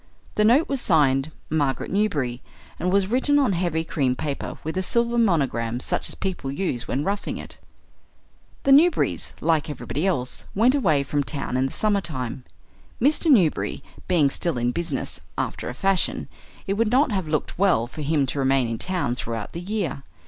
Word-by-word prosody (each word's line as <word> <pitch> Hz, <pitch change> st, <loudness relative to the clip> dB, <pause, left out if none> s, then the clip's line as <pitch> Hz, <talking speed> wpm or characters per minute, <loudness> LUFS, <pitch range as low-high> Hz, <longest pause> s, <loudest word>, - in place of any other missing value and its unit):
The 210 Hz, -, +2 dB
note 250 Hz, +9 st, +5 dB
was 275 Hz, -2 st, -1 dB
signed 145 Hz, -3 st, +3 dB, 0.2 s
"Margaret 145 Hz, -4 st, 0 dB
Newberry" 145 Hz, -, 0 dB, 0.4 s
and 180 Hz, +3 st, 0 dB
was 195 Hz, 0 st, +3 dB
written 260 Hz, +7 st, +2 dB
on 265 Hz, -8 st, +3 dB
heavy 170 Hz, -2 st, 0 dB
cream 135 Hz, -5 st, 0 dB
paper 140 Hz, +1 st, -4 dB
with 160 Hz, +2 st, -4 dB
a 185 Hz, -, 0 dB
silver 235 Hz, +4 st, +1 dB
monogram 130 Hz, -, +1 dB
such -, -, -2 dB
as -, -, -2 dB
people 180 Hz, -8 st, -3 dB
use 140 Hz, -6 st, -3 dB
when 140 Hz, -, -1 dB
roughing 200 Hz, +3 st, -2 dB
it. -, -, -8 dB, 1.0 s
The 275 Hz, -, +3 dB
Newberrys, 310 Hz, +5 st, +4 dB
like 160 Hz, -3 st, +1 dB
everybody 150 Hz, +4 st, -3 dB
else, 130 Hz, -9 st, -1 dB
went 235 Hz, +6 st, +4 dB
away 160 Hz, -, +2 dB
from 145 Hz, +1 st, -1 dB
town 140 Hz, -2 st, -3 dB
in 130 Hz, +1 st, +2 dB
the -, -, -7 dB
summertime. 155 Hz, -, -1 dB, 0.5 s
Mr. 300 Hz, +6 st, +2 dB
Newberry 190 Hz, -, +3 dB, 0.2 s
being 160 Hz, -7 st, +3 dB
still 170 Hz, -3 st, -1 dB
in 120 Hz, 0 st, +1 dB
business, 140 Hz, -, -3 dB, 0.2 s
after -, -, -3 dB
a 125 Hz, -, -6 dB
fashion, 195 Hz, +4 st, 0 dB, 0.4 s
it 195 Hz, -, 0 dB
would 220 Hz, +2 st, +1 dB
not 255 Hz, +2 st, +3 dB
have 190 Hz, -5 st, -1 dB
looked 155 Hz, +2 st, -2 dB
well 185 Hz, -, +3 dB
for 140 Hz, +6 st, -8 dB
him 145 Hz, -1 st, +1 dB
to 135 Hz, +2 st, -3 dB
remain 135 Hz, -2 st, +2 dB
in 115 Hz, -1 st, -3 dB
town 180 Hz, -10 st, 0 dB
throughout 115 Hz, -3 st, -4 dB
the 170 Hz, -, -6 dB
year. 190 Hz, -7 st, -3 dB
160 Hz, 180 wpm, -24 LUFS, 135-200 Hz, 1.0 s, note